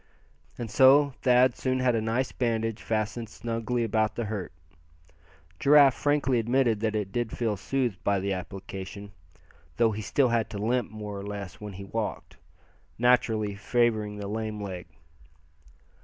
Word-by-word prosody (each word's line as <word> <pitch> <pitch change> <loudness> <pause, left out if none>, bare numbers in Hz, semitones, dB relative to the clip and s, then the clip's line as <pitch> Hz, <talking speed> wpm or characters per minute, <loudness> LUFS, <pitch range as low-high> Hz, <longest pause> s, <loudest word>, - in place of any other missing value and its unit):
And 115 -3 -5
so 140 +1 +6
Thad 125 -1 +4
soon 130 -1 -1
had 130 -1 +2
a 115 - +1
nice 115 +4 -1
bandage 115 -2 -1
fastened 110 +1 -2
snugly 115 +1 -2
about 110 -1 0
the 120 - -2
hurt. 105 -3 -4 1.1
Giraffe 140 -2 +6
frankly 145 -2 +1
admitted 120 -1 +2
that 110 0 -1
it 105 -3 -2
did 120 -1 -2
feel 115 -3 0
soothed 120 0 -2
by 100 -1 +2
the 100 +1 -1
application, 95 +2 -7 0.7
though 115 -1 +4
he 105 +1 -4
still 130 +5 +2
had 115 -2 0
to 105 - -6
limp 120 +3 0
more 105 -1 -6
or - - -7
less 100 -3 -7
when 105 -1 -7
he 100 +2 -8
walked, 110 +2 -4 0.6
naturally 115 -4 +2
favoring 110 0 0
the 100 -1 -5
lame 110 0 -3
leg. 95 -4 -6
110 Hz, 155 wpm, -27 LUFS, 105-120 Hz, 1.1 s, so